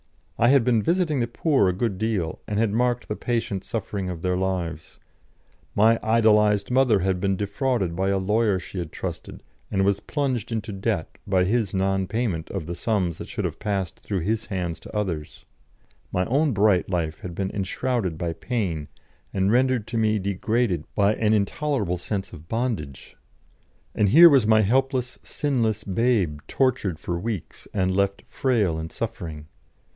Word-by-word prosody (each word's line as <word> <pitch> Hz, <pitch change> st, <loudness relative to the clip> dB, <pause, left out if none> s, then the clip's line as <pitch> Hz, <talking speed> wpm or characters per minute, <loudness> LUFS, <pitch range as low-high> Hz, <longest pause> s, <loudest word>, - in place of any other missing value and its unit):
I 120 Hz, -, +5 dB
had 135 Hz, -1 st, +5 dB
been 115 Hz, -2 st, +3 dB
visiting 165 Hz, -, +1 dB
the 120 Hz, -, +1 dB
poor 130 Hz, -, +2 dB
a -, -, 0 dB
good 100 Hz, 0 st, -2 dB
deal, 105 Hz, -8 st, -1 dB
and 105 Hz, -, -2 dB
had 110 Hz, -1 st, +2 dB
marked 120 Hz, +1 st, +1 dB
the 105 Hz, -, -2 dB
patient 115 Hz, -6 st, -2 dB
suffering 100 Hz, -3 st, -3 dB
of 85 Hz, -2 st, -6 dB
their 90 Hz, 0 st, +1 dB
lives; 90 Hz, -4 st, -3 dB, 0.8 s
my 115 Hz, +2 st, +5 dB
idolised 105 Hz, -2 st, +3 dB
mother 125 Hz, -6 st, +4 dB
had 95 Hz, 0 st, 0 dB
been 95 Hz, +1 st, +1 dB
defrauded 100 Hz, -2 st, -1 dB
by 95 Hz, +2 st, 0 dB
a 100 Hz, -, +2 dB
lawyer 105 Hz, +1 st, +2 dB
she 90 Hz, +1 st, -7 dB
had 85 Hz, -3 st, -5 dB
trusted, -, -, -6 dB, 0.3 s
and 95 Hz, -1 st, +1 dB
was 100 Hz, 0 st, +2 dB
plunged 130 Hz, -6 st, -2 dB
into 110 Hz, -1 st, -3 dB
debt 95 Hz, -3 st, -3 dB
by 95 Hz, -2 st, +3 dB
his 105 Hz, 0 st, 0 dB
non 95 Hz, 0 st, +1 dB
payment 105 Hz, -8 st, -2 dB
of 95 Hz, -5 st, -4 dB
the 85 Hz, -, -4 dB
sums 90 Hz, -3 st, -1 dB
that -, -, -6 dB
should -, -, -3 dB
have -, -, -4 dB
passed 100 Hz, -4 st, -2 dB
through 100 Hz, -4 st, -3 dB
his 110 Hz, +5 st, -1 dB
hands 90 Hz, -5 st, -3 dB
to -, -, -7 dB
others; 85 Hz, -8 st, -4 dB, 0.7 s
my 90 Hz, 0 st, +1 dB
own 145 Hz, -, +2 dB
bright 100 Hz, -4 st, +3 dB
life 80 Hz, -4 st, -2 dB
had 85 Hz, -2 st, -7 dB
been 95 Hz, +1 st, -2 dB
enshrouded 100 Hz, -2 st, -2 dB
by 85 Hz, 0 st, -2 dB
pain 85 Hz, -, -2 dB, 0.4 s
and 95 Hz, +1 st, +1 dB
rendered 125 Hz, -2 st, +2 dB
to 115 Hz, -, -4 dB
me 110 Hz, -1 st, +2 dB
degraded 100 Hz, -2 st, 0 dB
by 100 Hz, 0 st, +3 dB
an 110 Hz, -1 st, +1 dB
intolerable 105 Hz, -, 0 dB
sense 100 Hz, +1 st, -4 dB
of 80 Hz, -1 st, -11 dB
bondage; 110 Hz, -, -3 dB, 0.8 s
and 100 Hz, -, +2 dB
here 170 Hz, -, +9 dB
was 130 Hz, -6 st, +4 dB
my 110 Hz, 0 st, +5 dB
helpless, 130 Hz, +3 st, 0 dB
sinless 115 Hz, -7 st, -1 dB
babe 100 Hz, -7 st, +1 dB
tortured 125 Hz, -, 0 dB
for 85 Hz, +2 st, -3 dB
weeks 105 Hz, -3 st, -5 dB
and 95 Hz, -2 st, 0 dB
left 100 Hz, 0 st, 0 dB
frail 105 Hz, -11 st, 0 dB
and 80 Hz, 0 st, -6 dB
suffering. 75 Hz, -3 st, -5 dB
100 Hz, 170 wpm, -24 LUFS, 90-115 Hz, 0.8 s, here